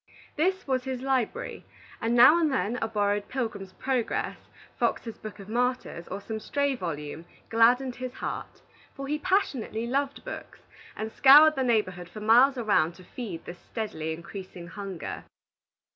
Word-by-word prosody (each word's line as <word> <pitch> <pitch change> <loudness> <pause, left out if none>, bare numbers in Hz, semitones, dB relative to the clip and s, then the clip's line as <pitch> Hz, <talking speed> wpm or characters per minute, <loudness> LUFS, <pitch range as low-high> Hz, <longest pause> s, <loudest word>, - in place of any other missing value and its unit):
This 375 +5 +1
was 260 -2 +1
his 260 -2 -3
library; 270 - -1 0.4
and 230 +1 +1
now 255 +8 +8
and 315 -3 +2
then 245 -2 0
a 225 - +1
borrowed 205 -1 0
"Pilgrim's 215 -7 -4
Progress," 255 0 -1 0.4
"Fox's 230 -2 -1
Book 215 -1 -8
of 200 -2 -11
Martyrs," 245 -6 -1
or 195 - -5
some 220 +2 -5
stray 280 +5 0
volume, 160 - -5 0.2
gladdened 245 +3 +4
his 255 -1 -5
heart; - - -6 0.3
for 275 - -6
he 300 +2 -1
passionately 290 - 0
loved 275 +3 -1
books, - - -8 0.3
and 220 +1 -4
scoured 295 +5 +8
the 270 - -2
neighborhood 185 -8 0
for 215 - -9
miles 245 +6 +5
around 200 -8 +2
to 185 - -14
feed 185 -4 -7
this 175 - -8
steadily 160 -8 -4
increasing 175 +1 -8
hunger. 195 -3 -6
230 Hz, 155 wpm, -27 LUFS, 200-265 Hz, 0.4 s, now